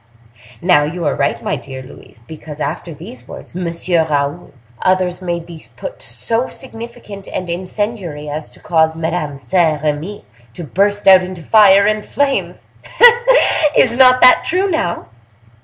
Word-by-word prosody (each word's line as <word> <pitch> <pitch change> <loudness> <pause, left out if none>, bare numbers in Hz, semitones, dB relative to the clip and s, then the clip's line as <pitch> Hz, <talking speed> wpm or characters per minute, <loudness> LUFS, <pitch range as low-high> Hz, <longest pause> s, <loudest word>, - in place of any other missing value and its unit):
Now, 175 -5 +4
you 165 +3 -4
are 145 - +1
right, 140 - -2
my - - -1
dear 130 -1 -9
Louise, 115 -2 -16
because 155 0 -10
after 165 +3 -4
these 125 -4 -11
words, - - -11
'Monsieur 170 -1 -1
Raoul', 145 +3 -2 0.3
others 185 -1 0
may 175 -2 -2
be 170 -1 -12
put - - -8
so 230 +3 -3
significant 230 -5 -10
and 185 - -5
incendiary 180 -3 -4
as 150 +1 -5
to - - -17
cause 160 -2 +1
Madame 160 -3 -3
Saint 160 -1 0
Remy 155 +7 -3 0.3
to 175 - -7
burst 200 +8 -1
out 190 -1 +8
into 185 -2 -8
fire 200 0 +5
and 215 0 0
flames! 280 +3 -1 0.3
Hein! 480 -9 +4
is 235 -2 +4
not 255 0 +5
that 255 - +7
true 370 +4 0
now? 315 - -2
180 Hz, 155 wpm, -16 LUFS, 155-215 Hz, 0.3 s, out